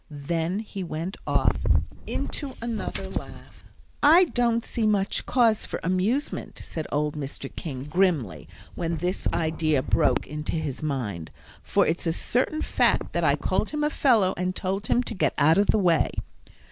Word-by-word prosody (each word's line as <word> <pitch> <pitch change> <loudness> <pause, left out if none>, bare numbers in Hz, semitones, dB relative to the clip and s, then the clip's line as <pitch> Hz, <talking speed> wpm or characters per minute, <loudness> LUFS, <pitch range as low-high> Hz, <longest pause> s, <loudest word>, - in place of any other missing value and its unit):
Then 165 +6 -2
he 200 -3 -6
went 165 +3 -4
off - - +2 0.5
into 280 -4 -4
another 215 -4 -4
laugh. 190 - -8 0.4
"I 325 +5 +7
don't 240 -7 +1
see 225 -2 0
much 200 -2 0
cause 230 -4 +3
for - - -4
amusement," 190 - -1
said 160 -2 -5
old 150 0 0
Mr. 140 -1 -6
King, 130 -6 -5
grimly, 155 - 0 0.3
when 170 -1 -2
this 180 +4 -1
idea 155 -4 +1
broke - - +2
into 150 +1 -5
his 155 -5 -3
mind, 120 - -3 0.3
"for - - +2
it's 165 +2 -1
a 165 - +2
certain 260 - 0
fact - - +1
that 170 - 0
I 140 -2 +4
called 185 +8 -1
him 300 0 -2
a 300 - +1
fellow, 220 -11 +3
and 180 +1 -1
told 195 +3 -2
him 245 - +2
to - - -4
get 190 - 0
out 155 +5 +5
of 205 - +3
the - - +4
way." 175 -6 +3
180 Hz, 165 wpm, -26 LUFS, 155-220 Hz, 0.5 s, I